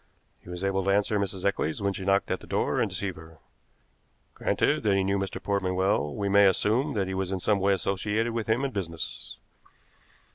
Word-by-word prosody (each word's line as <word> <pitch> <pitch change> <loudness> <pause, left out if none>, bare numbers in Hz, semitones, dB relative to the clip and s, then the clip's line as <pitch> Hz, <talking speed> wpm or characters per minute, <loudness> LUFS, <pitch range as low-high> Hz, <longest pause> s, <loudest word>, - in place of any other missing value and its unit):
He - - -15
was 90 +1 -6
able 95 0 0
to 100 - 0
answer 105 +1 +2
Mrs. 95 -2 -3
Eccles 80 -5 0
when 100 -1 0
she 95 - -6
knocked 100 +1 +2
at - - 0
the - - -14
door - - 0
and - - +1
deceive 95 -4 -4
her. 80 0 -13 1.0
Granted - - +1
that 100 -2 +2
he 95 - +2
knew 100 +1 +1
Mr. 95 0 -3
Portman 95 -2 -1
well, 95 -5 +1
we 100 - -2
may 100 0 +6
assume 115 - +2
that 100 -2 +1
he 95 - -4
was 95 0 -2
in 95 - -1
some 100 +2 +1
way 100 +1 +3
associated 105 +5 -1
with 115 -2 -3
him 120 +5 +2
in 135 - -2
business. 85 -6 -5
100 Hz, 215 wpm, -27 LUFS, 95-100 Hz, 1.0 s, may